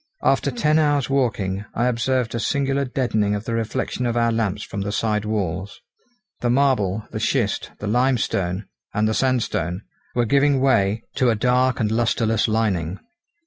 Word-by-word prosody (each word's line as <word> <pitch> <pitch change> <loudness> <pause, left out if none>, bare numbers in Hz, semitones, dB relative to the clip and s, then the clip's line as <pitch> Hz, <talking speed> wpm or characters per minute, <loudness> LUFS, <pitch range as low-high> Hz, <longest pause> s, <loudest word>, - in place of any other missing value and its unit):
After 135 +1 +2
ten 150 +5 +2
hours' 145 -4 +1
walking 105 -8 0
I 120 - +1
observed 125 0 0
a 115 - -1
singular 140 +2 0
deadening 110 -6 0
of 105 +2 -5
the 115 - -3
reflection 115 +2 -2
of 120 0 -1
our 115 0 +3
lamps 105 -3 -1
from 100 - -5
the 100 +1 -2
side 105 0 0
walls. 100 -3 -3 0.6
The 120 - 0
marble, 120 -6 +2
the - - -4
schist, - - 0
the - - -7
limestone, 105 -5 0 0.3
and 105 +1 +2
the 110 - +1
sandstone 110 -8 0 0.3
were 120 -1 +2
giving 140 +3 +3
way 115 -5 +2
to 130 - +3
a 115 - +2
dark 125 +3 +2
and 110 -3 0
lustreless 115 -1 +1
lining. 100 -6 0
115 Hz, 165 wpm, -22 LUFS, 105-130 Hz, 0.6 s, our